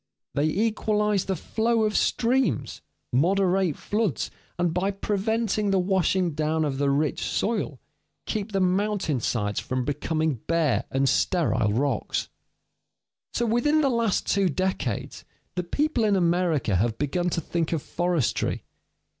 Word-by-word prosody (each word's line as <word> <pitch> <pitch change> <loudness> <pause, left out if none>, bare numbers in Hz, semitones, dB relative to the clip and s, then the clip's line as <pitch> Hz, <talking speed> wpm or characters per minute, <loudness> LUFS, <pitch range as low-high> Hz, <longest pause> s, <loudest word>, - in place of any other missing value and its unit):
They 145 - +1
equalize 210 +1 +1
the 190 - -1
flow 225 +6 0
of 215 -1 0
streams, 240 - +1 0.3
moderate 185 +3 +2
floods, 210 -6 -1 0.3
and 175 -2 +1
by 185 +3 +1
preventing 210 +1 0
the 195 - +3
washing 185 -1 +1
down 155 +1 0
of 135 -2 -2
the 140 -1 +2
rich 145 +1 0
soil, 230 +2 -1 0.5
keep 215 -1 -3
the 195 - 0
mountain 185 -5 +1
sides 105 -2 -1
from 130 -1 -2
becoming 155 0 -1
bare 165 -5 +1
and 135 +1 +1
sterile 150 - +2
rocks. 130 -1 -1 1.1
So, 240 - +1
within 240 +7 +2
the 280 - +3
last 230 -5 +1
two 195 -2 +2
decades, 185 +5 -2 0.3
the 180 - -1
people 285 - 0
in 210 -2 +3
America 170 - +2
have 110 +3 0
begun 175 +5 0
to 170 - -1
think 165 0 -2
of 160 -4 -1
forestry. 175 -6 -1
180 Hz, 140 wpm, -26 LUFS, 150-210 Hz, 1.1 s, the